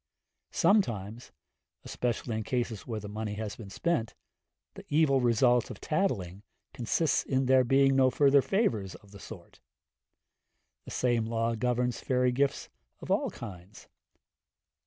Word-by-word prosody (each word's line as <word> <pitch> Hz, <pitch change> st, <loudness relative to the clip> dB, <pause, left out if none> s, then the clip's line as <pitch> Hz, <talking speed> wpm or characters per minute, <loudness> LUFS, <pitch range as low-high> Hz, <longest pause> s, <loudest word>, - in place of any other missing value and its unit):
Sometimes 115 Hz, -, 0 dB, 0.5 s
especially 120 Hz, -1 st, -3 dB
in 110 Hz, -, -2 dB
cases 120 Hz, -3 st, -3 dB
where 115 Hz, -3 st, -3 dB
the 105 Hz, -, -8 dB
money 105 Hz, 0 st, -4 dB
has 105 Hz, -1 st, -5 dB
been 105 Hz, -4 st, -10 dB
spent 130 Hz, -, -1 dB, 0.6 s
the -, -, -11 dB
evil 145 Hz, -3 st, +3 dB
result 120 Hz, 0 st, +3 dB
of -, -, -8 dB
tattling 100 Hz, -, -2 dB, 0.3 s
consists 140 Hz, +6 st, 0 dB
in 135 Hz, 0 st, 0 dB
there 130 Hz, 0 st, +5 dB
being 135 Hz, +2 st, +3 dB
no 130 Hz, -1 st, +5 dB
further 140 Hz, +1 st, +4 dB
favours 115 Hz, -, -1 dB
of 100 Hz, -, -17 dB
the 100 Hz, -, -12 dB
sort. 95 Hz, -5 st, -12 dB, 1.3 s
The -, -, -9 dB
same 120 Hz, -3 st, +1 dB
law 115 Hz, 0 st, 0 dB
governs 125 Hz, +1 st, -1 dB
fairy 125 Hz, -1 st, +1 dB
gifts 140 Hz, +2 st, 0 dB, 0.3 s
of -, -, -6 dB
all -, -, +1 dB
kinds. 100 Hz, -2 st, -11 dB
120 Hz, 135 wpm, -29 LUFS, 110-135 Hz, 1.3 s, there